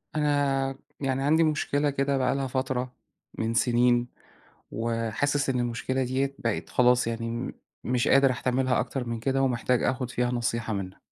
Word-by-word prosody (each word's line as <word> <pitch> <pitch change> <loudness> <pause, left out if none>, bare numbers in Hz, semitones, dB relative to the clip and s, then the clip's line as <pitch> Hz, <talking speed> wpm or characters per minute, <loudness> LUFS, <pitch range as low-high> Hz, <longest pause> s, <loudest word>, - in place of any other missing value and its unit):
أنا 140 -3 +1 0.2
يعني 135 -1 -1
عندي 160 +3 +4
مشكلة 150 -1 +1
كده 140 0 0
بقى 130 0 +1
لها 135 -1 -1
فترة 130 -1 -2 0.4
من 115 +1 -1
سنين 120 +1 +3 0.6
وحاسس 115 +5 -1
إن 125 -2 +1
المشكلة 120 +2 -1
ديّة 135 +2 -1
بقي 115 -2 -1
خلاص 125 -1 +3
يعني 115 0 -3
م 120 +2 -3 0.3
مش 125 -1 0
قادر 135 -1 +5
أحتملها 130 +1 0
أكتر 135 -2 -2
من 115 -1 -3
كده، 135 +3 0
ومحتاج 125 -1 +1
آخد 125 -1 -1
فيها 125 0 0
نصيحة 115 -2 -1
منك. 95 -2 -5
125 Hz, 155 wpm, -27 LUFS, 120-135 Hz, 0.6 s, قادر